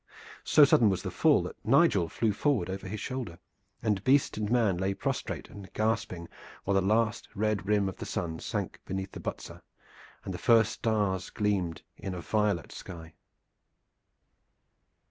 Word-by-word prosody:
So 150 - +7
sudden 120 -5 +5
was 95 -2 -1
the - - -3
fall - - +4
that - - -8
Nigel 85 -2 +4
flew 110 +6 0
forward 110 -7 0
over 95 0 -5
his 105 +3 -5
shoulder, 120 -10 -5 0.5
and 105 -4 0
beast 135 +2 +3
and 105 -1 -2
man 110 -6 +2
lay 95 +2 -1
prostrate - - -3
and 95 -4 -11
gasping 110 -6 -1 0.4
while 100 - 0
the 95 - +4
last 110 +2 +1
red 105 -2 0
rim 105 -2 +2
of 95 - -5
the - - -6
sun 80 -2 -3
sank - - -4
behind 95 0 -4
Butser - - -7 0.6
and - - -4
the - - -6
first 115 -2 +4
stars 100 -5 -1
gleamed 95 -6 -1
in 95 -2 -5
a 90 - -5
violet 105 -3 0
sky. 80 -2 -9
100 Hz, 160 wpm, -29 LUFS, 95-110 Hz, 0.6 s, So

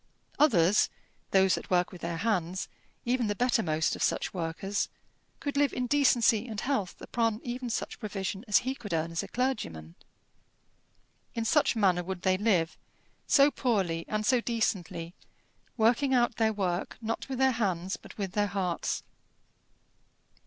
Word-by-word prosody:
Others, 205 - +4 0.4
those 190 -1 +4
that - - -3
work 180 -1 +2
with 180 - -11
their 170 0 -3
hands, 185 -3 -1 0.4
even 245 -1 +1
the 205 - -1
bettermost 205 -10 +1
of - - -8
such - - 0
workers 185 +3 -2 0.5
could 285 -1 -3
live 285 -1 +3
in 250 - -1
decency 245 -4 +3
and 220 -3 -5
health 245 -9 -2
upon 225 -2 0
even 245 0 -4
such 230 - -3
provision 195 -1 -4
as 210 +3 +3
he 260 - 0
could 230 -8 -7
earn 165 +1 -1
as 165 - -1
a - - -7
clergyman. 85 - -2 1.4
In 230 -1 -1
such 295 +1 +3
manner 185 -5 +3
would 185 0 -5
they 185 -1 +3
live, 185 -7 +1 0.5
so 280 +1 +6
poorly 190 -12 0
and 215 0 -1
so 250 +2 +3
decently, 185 -8 -2 0.6
working 245 +4 +3
out 240 -2 +2
their 220 -1 +3
work, 190 -4 -2
not 230 +3 -4
with 265 - -3
their 265 0 +4
hands 190 -5 -1
but - - -13
with 195 -3 -3
their 205 +1 +1
hearts. 185 -3 -2
210 Hz, 155 wpm, -29 LUFS, 180-240 Hz, 1.4 s, so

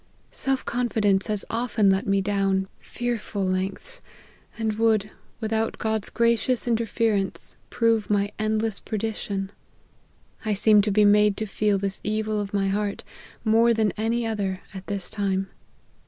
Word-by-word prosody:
Sell 270 0 0
ccnfidence 220 -6 +1
has 210 -2 +3
often 225 -3 +2
let 190 +1 0
me 195 0 +2
down 195 -1 0
fearful 230 -5 -3
lengths; 190 - -3 0.6
and 220 -1 -1
would, 220 -2 +2 0.3
without 220 0 -1
God's 220 -2 -1
gracious 235 +1 +1
interference, 225 -4 0 0.2
prove 230 -2 +1
my 205 0 +1
endless 215 -1 0
perdition. 205 -3 -3 0.9
I 215 -2 0
seem 210 +1 +5
to 210 +1 -1
be 210 +1 +4
made 210 0 +4
to 220 - -2
feel 205 0 +1
this 195 0 -2
evil 215 0 -1
of 200 -1 -5
my 195 -1 0
heart, 205 0 -2 0.4
more 230 +1 +4
than 215 -2 +2
any 230 +2 0
other, 200 -4 -2
at 190 -1 -9
this 200 -3 -2
time. 195 -2 0
210 Hz, 140 wpm, -25 LUFS, 195-225 Hz, 0.9 s, seem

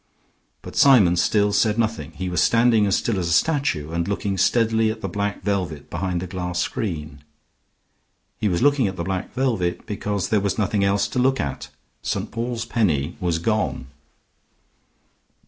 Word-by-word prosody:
But - - -9
Symon 110 -11 +6
still 100 +3 +2
said 105 +1 +2
nothing. 110 -10 -2
He 95 +2 -5
was 90 -1 0
standing 115 -2 +4
as 95 - +2
still 110 -5 0
as 85 - -2
a - - +2
statue, 135 - +1
and 85 +1 -2
looking 100 0 -2
steadily 110 +3 +2
at 110 0 -5
the 95 - -3
black 100 +1 -3
velvet 90 -7 -3
behind 90 0 -2
the - - -4
glass 90 -1 -4
screen. 80 - -3 1.2
He 105 - 0
was 85 +3 0
looking 140 -5 +3
at 95 - -4
the 85 - -4
black 95 +1 -3
velvet 115 -10 -1
because 105 -2 -3
there 105 -2 +2
was 100 -1 -1
nothing 100 -1 +1
else 100 +1 +2
to 125 - -2
look 130 +1 +2
at. 70 -2 -4 0.3
St. - - -3
Paul's 115 0 -3
Penny 90 - 0
was 85 -2 0
gone. 105 - -1
100 Hz, 170 wpm, -22 LUFS, 90-115 Hz, 1.2 s, Symon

